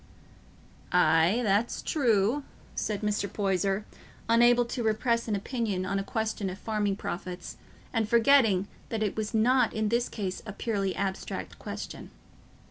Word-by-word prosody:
"Aye, 175 +5 +4
that's 210 +2 +1
true," 240 -1 +2 0.3
said 210 -2 -2
Mr. 210 -2 -1
Poyser, 195 0 0 0.4
unable 240 +1 +5
to 240 +1 -4
repress 230 +1 +1
an 215 - 0
opinion 200 -3 -2
on 195 +1 -1
a - - -2
question 215 -2 -2
of 185 - -6
farming 210 -2 -1
profits, 180 -1 -6 0.4
and 225 -3 0
forgetting 225 -5 +4 0.2
that 220 -1 -1
it 205 - -1
was 215 +1 -3
not 250 +4 +3
in 215 -1 0
this 235 +2 +1
case 190 -4 -4
a 215 - -7
purely 200 -3 -1
abstract 190 -1 -4
question. - - -7
215 Hz, 140 wpm, -28 LUFS, 195-230 Hz, 0.4 s, unable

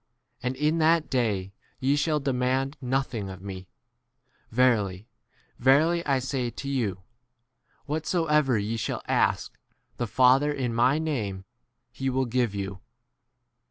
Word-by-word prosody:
And 125 +1 -2
in 150 +4 +1
that 160 0 +3
day 105 -7 0 0.3
ye 135 +1 +2
shall 150 +1 +1
demand 135 +1 0
p 125 - -8
nothing 125 -6 -1
of 95 -1 -8
me: 95 -2 -7 0.8
ve 125 +3 +2
rily, 105 -5 +1 0.5
verily, 155 +7 +4
I 135 -2 +3
say 130 -1 -2
to 140 - -8
you, 110 -9 -2 0.8
What 155 +1 -3
soever 150 -7 +2
ye 105 +3 -2
shall 110 - -3
aski - - +1 0.5
the 120 - -2
Father 130 +5 +4
in 130 -5 -2
my 125 +5 +3
name, 110 -12 -3 0.5
he 135 0 -2
will 130 0 +1
give 120 -3 0
you. 100 -1 -5
130 Hz, 140 wpm, -27 LUFS, 110-140 Hz, 0.8 s, verily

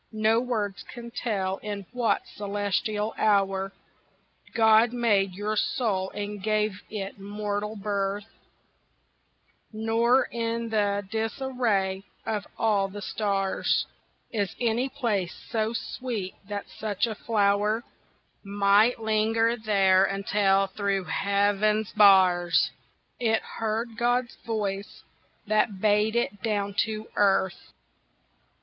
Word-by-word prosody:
No 220 +1 +3
words 220 -5 -2
can 235 -1 -9
tell 195 -6 -2
in 205 -2 -6
what 245 -2 +1
celestial 205 +1 -2
hour 195 -2 +2 0.8
God 220 +1 +5
made 205 -6 +2
your 210 +2 -2
soul 205 -4 0
and 205 0 -4
gave 215 -1 0
it 200 -2 -5
mortal 205 +1 -3
birth, 200 0 -2 1.5
Nor 225 +3 +2
in 230 0 -2
the 205 -2 0
disarray 220 -4 -1 0.2
of 210 -2 -2
all 205 -3 +2
the 205 +1 -8
stars 195 -2 0 0.5
Is 205 -5 -2
any 240 +2 +1
place 210 -9 -1 0.2
so 220 -1 0
sweet 230 -4 -4 0.2
that 205 -1 -4
such 210 -1 -2
a 225 - -3
flower 210 +1 +1 0.6
Might 205 +3 +3
linger 225 +1 +2
there 195 -4 +3
until 195 0 +2
thro' 195 0 -1
heaven's 205 +2 +1
bars, 185 -4 +5 0.5
It 225 -2 +1
heard 225 +1 -3
God's 245 +1 +1
voice 205 -3 -3 0.4
that 215 -1 +1
bade 210 +2 +2
it 210 -4 -1
down 205 -3 -1
to 220 -1 -5
earth. 190 -2 +1
210 Hz, 105 wpm, -27 LUFS, 200-225 Hz, 1.5 s, God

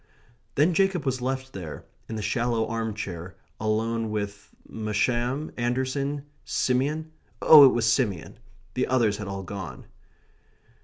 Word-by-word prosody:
Then 155 +5 +4
Jacob 190 -4 +2
was 130 -2 -1
left 130 +1 -3
there, 85 -6 -7 0.2
in 110 - -4
the 105 - -3
shallow 115 -1 0
arm 110 -2 -3
chair, 90 -4 -6 0.2
alone 110 +1 0
with 100 -1 -4 0.2
Masham? 120 +6 -1
Anderson? 130 +4 -1 0.2
Simeon? 145 +5 0 0.3
Oh, 150 -3 +10
it - - +3
was 120 -2 +1
Simeon. 115 - 0 0.3
The - - 0
others 115 -5 +2
had 105 - -6
all 95 0 -4
gone. 95 +1 -7
120 Hz, 135 wpm, -26 LUFS, 105-135 Hz, 0.3 s, Oh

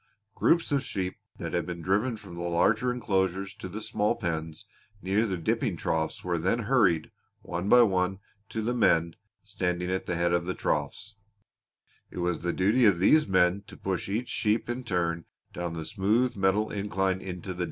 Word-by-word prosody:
Groups 170 -2 +2
of 140 -1 +2
sheep 95 -6 -3 0.2
that - - -5
had - - -1
been 85 -1 -5
driven 105 +6 +1
from 100 -4 -12
the 85 - -6
larger 105 +8 +2
enclosures 95 -5 -1
to - - -8
the 105 +4 -6
small 105 +2 0
pens 80 -7 -4 0.3
near 100 +4 +1
the 95 -3 -2
dipping 110 - -1
troughs 80 -1 -2
were 85 -2 -1
then 105 +8 0
hurried, 100 - +2 0.3
one 90 +4 -3
by 125 +1 +8
one, 95 -2 +1 0.3
to 110 - -3
the 120 +3 0
men 85 -8 +2 0.3
standing 90 0 -2
at 95 - -2
the 85 - -1
head 85 +1 +1
of 85 0 +1
the 90 - -2
troughs; 105 +1 -2 0.9
it - - -11
was 90 -2 0
the 90 - -1
duty 105 +9 +2
of 100 -4 +5
these 150 - +4
men 95 0 +3
to - - -12
push 95 -1 -3
each 115 +5 -2
sheep 110 +1 0
in 125 +1 -4
turn 85 -6 -1 0.3
down 85 -1 -4
the 80 -1 -5
smooth 110 +9 +1
metal 100 +2 +1
incline 95 -2 -1
into 90 -1 -7
the - - -13
dip. - - -10
95 Hz, 190 wpm, -28 LUFS, 90-110 Hz, 0.9 s, by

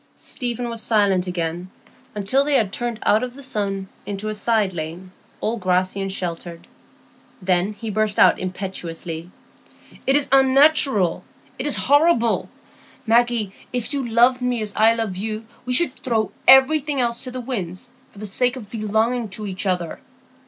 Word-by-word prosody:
Stephen 245 -1 -3
was 230 -1 +2
silent 200 -5 +2
again 175 0 -3 0.5
until 210 +7 +1
they 290 0 +1
had 215 -6 +1
turned 240 -2 -3
out 215 - +4
of 250 0 -5
the 280 - -10
sun 200 -6 -3 0.2
into 205 +1 -5
a - - -2
side 210 -2 +1
lane, 170 +3 -6 0.3
all 225 +2 -1
grassy 185 0 0
and 195 0 -3
sheltered. 170 -2 -5 0.7
Then 185 +2 +1
he 220 +1 -6
burst 215 0 0
out - - +5
impetuously,— 175 -3 -5 0.8
"It 270 - +4
is 290 -1 +2
unnatural, 270 - +4 0.4
it 265 - -2
is 290 - +2
horrible. 285 -5 +2 0.6
Maggie, 230 -3 +2 0.2
if 250 +2 -3
you 270 -4 -2
loved 245 +3 +4
me 250 -1 0
as 210 -1 -4
I 225 +1 +5
love 220 -5 -3
you, 215 +2 -4 0.2
we 250 - 0
should 295 0 +4
throw 225 -4 -1 0.2
everything 275 +2 +5
else 235 -1 0
to 255 - -6
the 255 0 -5
winds 235 -3 -5 0.2
for - - -20
the 215 - -6
sake 245 +5 0
of 215 -6 -10
belonging 220 +1 0
to 210 +2 -7
each 190 0 -4
other. 180 -3 -1
220 Hz, 165 wpm, -21 LUFS, 190-250 Hz, 0.8 s, out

